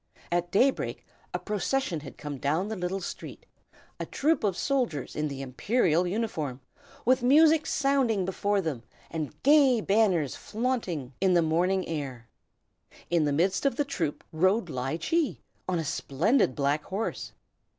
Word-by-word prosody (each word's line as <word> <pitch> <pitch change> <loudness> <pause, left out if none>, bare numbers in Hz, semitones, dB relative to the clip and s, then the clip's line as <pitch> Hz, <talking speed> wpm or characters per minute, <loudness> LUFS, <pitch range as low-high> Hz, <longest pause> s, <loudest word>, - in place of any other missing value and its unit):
At 175 0 0
daybreak 260 +9 +1 0.3
a - - -1
procession 210 - -1
had 140 -2 -11
come 145 -2 -6
down 160 +10 0
the 220 - -3
little 185 +1 -3
street, - - -7 0.5
a - - -3
troop 315 0 +1
of 195 -3 0
soldiers 245 - -1
in 150 0 -1
the 135 -1 -5
imperial 175 - +1
uniform, 170 - -2 0.5
with 255 +1 +4
music 305 +4 +5
sounding 265 -8 +1
before 200 +2 0
them, 155 -9 -3 0.3
and 155 -2 -4
gay 275 -4 +6
banners 195 - +2
flaunting 210 - -3
in 190 -2 +4
the 170 - +4
morning 180 +4 +1
air. 135 -7 -5 0.8
In 170 -3 +3
the 145 - +1
midst 185 +6 +1
of 275 - +2
the 290 - 0
troop 165 - -3
rode 185 +3 +2
Ly 130 +4 -2
Chee, 310 - 0 0.3
on 180 - +1
a 165 - -2
splendid 145 - +1
black 145 +1 0
horse. 205 +4 -4
185 Hz, 150 wpm, -28 LUFS, 150-235 Hz, 0.8 s, gay